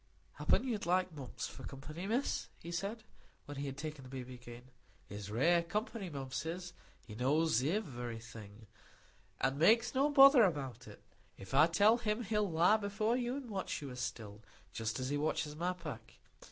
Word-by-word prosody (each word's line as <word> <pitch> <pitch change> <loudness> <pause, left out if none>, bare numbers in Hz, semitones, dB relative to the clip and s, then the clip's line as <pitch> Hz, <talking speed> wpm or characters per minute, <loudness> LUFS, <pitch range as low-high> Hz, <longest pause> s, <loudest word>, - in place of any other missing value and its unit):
"Happen - - +3
you'd 215 -7 -2
like 185 0 +2
Mumps 135 -5 -6
for - - -11
company, 150 +8 -7
Miss," 245 +6 0
he 170 - -9
said 200 +6 -3 0.4
when 145 -1 -8
he 140 +1 -3
had 135 0 -6
taken 150 -1 -6
the 130 - -11
baby 130 -1 -7
again. 120 -1 -11 0.4
"He's 100 0 -7
rare 165 +11 +3
company, 205 +3 -3
Mumps 135 -2 -4
is; 175 +2 -5 0.3
he 110 - -10
knows 135 +3 +2
iverything, 120 - -4 0.8
an' 135 +2 +1
makes 225 +8 +5
no 275 +2 +3
bother 275 -2 +8
about 145 - 0
it. - - -13 0.3
If 95 +4 -11
I 150 +4 +7
tell 210 +7 +4
him, 225 0 -1
he'll 210 -1 0
lie 175 +6 +4
before 215 +2 0
you 245 0 -1
an' 275 -3 -6
watch 195 -3 -3
you, 140 -3 -7
as 125 - -7
still,—just 110 0 -6
as 130 0 -2
he 145 - 0
watches 150 0 -1
my 175 +3 -1
pack. 155 -11 -8
160 Hz, 175 wpm, -34 LUFS, 130-205 Hz, 0.8 s, bother